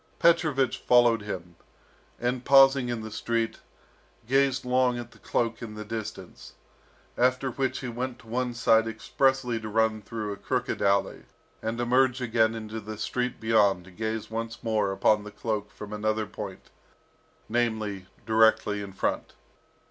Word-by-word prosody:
Petrovich 155 -7 +3
followed 120 -2 +4
him, 90 -4 -6 0.6
and 125 +1 -1
pausing 135 -2 +6
in 120 -2 -3
the 110 - -7
street, 115 +1 -2 0.7
gazed 135 +1 +2
long 125 -1 +2
at 120 0 -7
the 110 - -19
cloak 115 +3 -1
in 110 -3 -7
the 105 0 -7
distance, 110 0 -7 0.7
after 130 +1 +2
which 135 +1 -2
he 130 - -4
went 125 +1 -4
to - - -18
one 120 +1 -2
side 115 -1 +4
expressly 125 +2 0
to 110 0 -6
run 110 0 +1
through 105 0 -4
a - - -9
crooked - - -2
alley, 100 0 +1 0.4
and 115 +1 -3
emerge 125 +1 +3
again 115 -2 +2
into 110 0 -6
the 110 0 -7
street 125 +3 -2
beyond 105 -5 +3
to 95 - -14
gaze 110 +3 -4
once 115 0 -5
more 110 -3 +1
upon 105 +2 +2
the 105 - -8
cloak 105 0 -3
from 105 0 -9
another 110 +1 -1
point, 100 -2 -8 0.8
namely, 110 -5 -1 0.2
directly 110 -2 +3
in 100 -1 -8
front. - - -2
115 Hz, 155 wpm, -27 LUFS, 105-125 Hz, 0.8 s, pausing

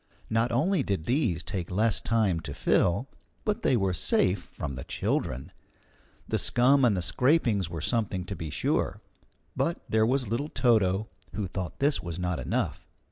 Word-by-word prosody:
Not 115 +2 +2
only 160 - +2
did 100 -10 -2
these 115 - +1
take 90 -2 -4
less 110 +4 +1
time 110 -7 +1
to - - -7
fill, 100 +10 +2 0.4
but 210 -1 0
they 125 - +3
were 95 -3 +1
safe 90 +2 +1
from 70 - -5
the 65 - -6
children. 65 +2 -2 0.8
The - - 0
scum 135 +3 +4
and 110 -6 +4
the 90 - -1
scrapings 120 - +2
were 85 -2 -5
something, 100 -3 -1
to 100 - -5
be 80 -4 -5
sure. - - 0 0.6
But 170 - 0
there 110 0 +3
was 130 0 +1
little 125 +8 -2
Toto, 110 -6 +2 0.3
who 105 - -1
thought 90 -2 -5
this 145 +1 +1
was 85 -1 -5
not 90 -3 -1
enough. 65 - -2
105 Hz, 170 wpm, -28 LUFS, 90-125 Hz, 0.8 s, scum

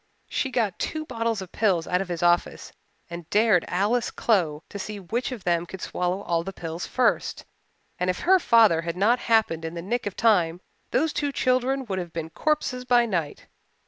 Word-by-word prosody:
She 265 - -1
got 230 -7 -1
two 310 0 -3
bottles 230 -6 -2
of 185 - -13
pills 190 -7 +1
out 180 +1 +1
of 195 - -4
his 175 -1 -4
office 175 0 +1 0.4
and 170 -1 -9
dared 210 -5 +3
Alice 210 +6 +1
Clow 165 -9 0
to 200 - -7
see 210 +1 -5
which 230 +8 -3
of 235 -7 -7
them 175 -1 0
could 190 - -8
swallow 180 +3 -2
all 170 -1 0
the 195 - -5
pills 165 -2 -6
first, 255 -2 0 0.5
and 180 - 0
if 180 - -2
her 375 +1 +5
father 220 - +5
had 170 +1 -4
not 230 +6 +3
happened 220 -10 +1
in 165 +1 -5
the 170 - -4
nick 235 +4 -2
of 200 - -5
time 180 -7 +2 0.3
those 310 +3 +1
two 285 -1 -1
children 255 0 +1
would 190 -4 -3
have 175 -2 -6
been 165 -1 -5
corpses 255 - -1
by 245 -1 +4
night. 170 -9 -3
195 Hz, 200 wpm, -25 LUFS, 175-240 Hz, 0.5 s, her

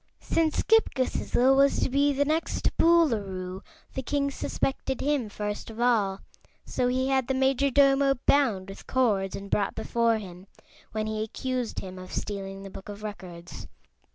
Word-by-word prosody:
Since 320 -2 0
Ghip 445 0 +3
Ghisizzle 260 0 +2
was 275 +1 +4
to - - +2
be 280 +2 +2
the 285 +1 +1
next 315 +3 -1
Boolooroo, 200 - +2 0.3
the 265 - -3
king 280 +2 -1
suspected 265 -1 -2
him 280 -6 0
first 210 +1 -5
of 225 +1 -10
all, 215 -6 +2 0.4
so 250 - 0
he 260 +1 0
had 265 -2 +1
the 265 - 0
Majordomo 275 +1 +3
bound 220 -10 +2
with 195 - -11
cords 210 -7 +1
and 200 - -7
brought 200 -1 0
before 230 -1 +1
him, 185 -2 -10 0.4
when 215 0 -2
he 215 0 -2
accused 250 +2 -3
him 185 -1 -8
of 185 - -10
stealing 195 -1 -4
the 195 - -9
Book 195 - -10
of 205 +1 -8
Records. 180 -5 -8
240 Hz, 160 wpm, -27 LUFS, 200-275 Hz, 0.4 s, was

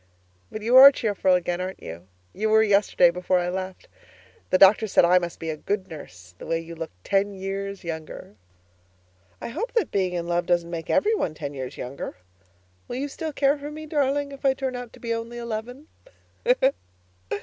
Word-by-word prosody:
But 215 - -6
you 240 +3 +2
are 275 +1 +12
cheerful 205 -7 +1
again, 175 0 -1
aren't 185 +1 -6
you? 85 +3 -9 0.3
You 215 +3 -1
were 220 0 +5
yesterday 200 -4 +4
before 180 +1 0
I 175 0 0
left. 185 0 -5 0.6
The 185 - +4
doctor 195 +3 +6
said 190 - +4
I 180 +1 +5
must 175 -1 -5
be 165 -1 -3
a - - -4
good 190 +4 -3
nurse, 90 - -11
that 165 0 -2
you 165 0 -10
looked 160 - -9
ten 200 0 0
years 195 +1 -5
younger. 160 -9 -7 1.1
I - - -6
hope 460 - -4
that 465 -3 0
being 185 -2 0
in 170 -1 -2
love 175 +1 -1
doesn't 170 -1 +1
make 165 -2 -5
every 430 +2 +3
one 165 - -1
ten 145 -2 -6
years 130 -2 -6
younger. 125 -6 -6 0.7
Will - - -5
you 275 +3 -2
still 315 +3 -5
care 280 0 +2
for 290 +1 -6
me, 310 +1 -8
darling, 285 -1 0
if 275 0 -11
I 270 -1 +3
turn 265 -1 -3
out 245 -2 -7
to - - -15
be 230 -1 -2
only 230 +1 -5
eleven? 235 +4 -6
195 Hz, 195 wpm, -25 LUFS, 170-245 Hz, 1.1 s, are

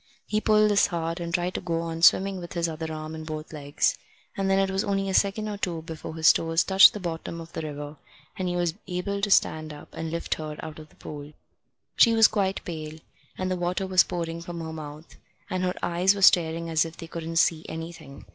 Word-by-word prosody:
He 215 0 -1
pulled 215 -1 +4
this 205 - +4
hard, 165 -1 -3
and 170 -1 -4
tried 175 +1 0
to - - -3
go 165 -2 -1
on 165 0 -5
swimming 190 +2 +5
with 175 -1 -8
his 170 -1 0
other 160 0 -5
arm 155 0 -6
and 160 0 -7
both 155 0 -7
legs; 145 -1 0 0.4
and 195 -1 -1
then 195 - +3
it 195 0 +2
was 190 +1 0
only 195 -1 -1
a - - -2
second 205 +2 +1
or 210 -1 -4
two 170 -5 -3
before 160 -1 -7
his 160 -1 +6
toes 165 +1 +1
touched 190 0 +7
the 210 - -5
bottom 170 -2 -5
of 165 0 -10
the - - -4
river, 145 -1 -6 0.4
and 185 -3 -3
he 175 - -2
was 175 -2 0
able 200 +3 -3
to 205 - 0
stand 155 -5 +2
up 150 0 -11
and 165 0 -4
lift 170 +1 -2
her 155 -1 -6
out 155 0 -8
of 155 0 -12
the - - -24
pool. 145 0 -9 0.6
She 230 -2 +6
was 225 -1 +7
quite 195 -2 -1
pale, 155 -2 -6 0.4
and 185 0 -2
the - - +1
water 180 +2 -1
was 185 -2 +5
pouring 170 -2 -4
from 170 0 -7
her 160 0 -6
mouth, 155 0 -9 0.3
and 185 - -1
her 180 0 0
eyes 180 +3 +3
were 200 - -2
staring 165 -2 +4
as 160 -1 +2
if 165 0 -8
they 165 - -8
couldn't 165 0 -6
see 165 -1 +3
anything. 160 -3 -8
170 Hz, 235 wpm, -26 LUFS, 160-190 Hz, 0.6 s, touched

